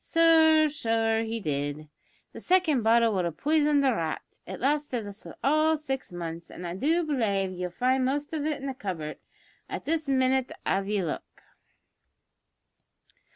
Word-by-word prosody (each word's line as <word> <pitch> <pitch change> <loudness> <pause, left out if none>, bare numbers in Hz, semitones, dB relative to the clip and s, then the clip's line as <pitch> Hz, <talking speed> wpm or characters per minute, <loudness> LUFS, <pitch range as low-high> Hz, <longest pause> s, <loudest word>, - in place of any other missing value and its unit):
Sure 320 -1 +5
so 225 -5 0
he 225 0 -3
did. 145 -3 -3 0.5
The - - -8
second 355 -8 +2
bottle 230 0 +4
would 185 -3 0
have 165 -2 -4
poison'd 295 -2 +2
a 260 - +4
rat. 165 -6 -2 0.2
It 190 - -6
lasted 275 -4 0
us 205 0 -10 0.2
all 310 +3 +3
six 270 -7 -5
months, 170 -1 -6
an' 180 - -8
I 170 - -4
do 320 - +1
belave 210 - 0
ye'll 180 0 -4
find 255 +8 +1
the - - +2
most 290 +2 -4
of 305 -2 -2
it 305 -1 -1
in 275 - -7
the 270 - -2
cupboard 175 -10 -5 0.5
at - - -5
this 315 -1 -1
minnit 260 -1 +2
av 195 0 0
ye 205 -2 0
look." 160 - -6
250 Hz, 165 wpm, -27 LUFS, 190-295 Hz, 0.5 s, Sure